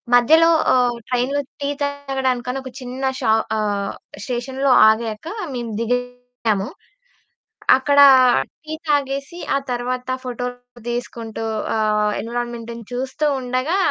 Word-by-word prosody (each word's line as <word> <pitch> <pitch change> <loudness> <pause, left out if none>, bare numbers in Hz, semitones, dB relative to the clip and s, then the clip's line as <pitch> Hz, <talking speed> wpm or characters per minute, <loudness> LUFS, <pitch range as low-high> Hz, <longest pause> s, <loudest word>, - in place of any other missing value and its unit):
మధ్యలో 320 +7 +6 0.3
ఆహ్, 245 -1 +2
ట్రైన్‌లో 255 +3 0 0.2
టీ 280 - -1
తాగడానికని 270 -3 -1
ఒక 260 - -7
చిన్న 255 +1 -6 0.2
షా 220 - +3 0.2
ఆహ్, 205 -2 -1 0.3
స్టేషన్‌లో 260 +2 -1 0.2
ఆగాకా 220 - -2 0.2
మేము 240 -2 -4
దిగాము. 245 -3 -2 1.1
అక్కడా 285 +1 +6 0.6
టీ 310 - -5
తాగేసి, 280 +2 -1 0.2
ఆ - - +4
తర్వాత 250 +1 -3
ఫోటోలు 245 0 -6
తీసుకుంటూ 230 -2 -5 0.3
ఆహ్, 210 -1 +2
ఎన్విరాన్‌మెంటును 235 0 -5
చూస్తూ 260 +4 -2
ఉండగా 255 +7 -1
245 Hz, 105 wpm, -21 LUFS, 235-270 Hz, 1.1 s, మధ్యలో